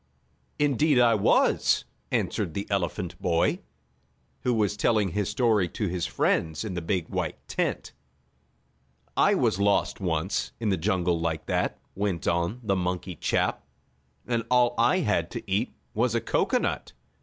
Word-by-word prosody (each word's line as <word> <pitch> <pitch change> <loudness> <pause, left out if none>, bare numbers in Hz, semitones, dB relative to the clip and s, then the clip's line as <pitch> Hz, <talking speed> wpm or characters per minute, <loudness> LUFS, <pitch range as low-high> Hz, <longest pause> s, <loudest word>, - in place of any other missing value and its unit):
"Indeed 145 0 +3
I 120 -2 +5
was," 105 - +3 0.2
answered 80 - -1
the 100 - -2
elephant 90 -1 -2
boy, 85 -1 +1 0.8
who 125 - 0
was 105 -3 +1
telling 105 -2 +2
his 100 +2 -1
story 110 -8 +2
to 105 +4 -2
his 90 -1 -2
friends 80 +6 0
in 105 - -4
the 90 - -3
big, 90 -1 -1
white - - -4
tent. - - -2 1.2
"I - - +4
was 95 - +1
lost 100 0 +2
once, 85 0 -1
in 115 -2 0
the 95 - +3
jungle 90 -1 +1
like 80 -1 -2
that," - - -1 0.2
went 95 -4 -2
on 85 +8 0
the 100 -3 +1
monkey 90 0 -2
chap, - - 0 0.6
"and 120 -2 0
all 125 -1 +4
I 120 +10 +3
had 85 - 0
to - - -6
eat 105 +6 0 0.2
was 120 +1 +1
a - - +3
cocoanut. 115 - 0
100 Hz, 150 wpm, -27 LUFS, 85-115 Hz, 1.2 s, I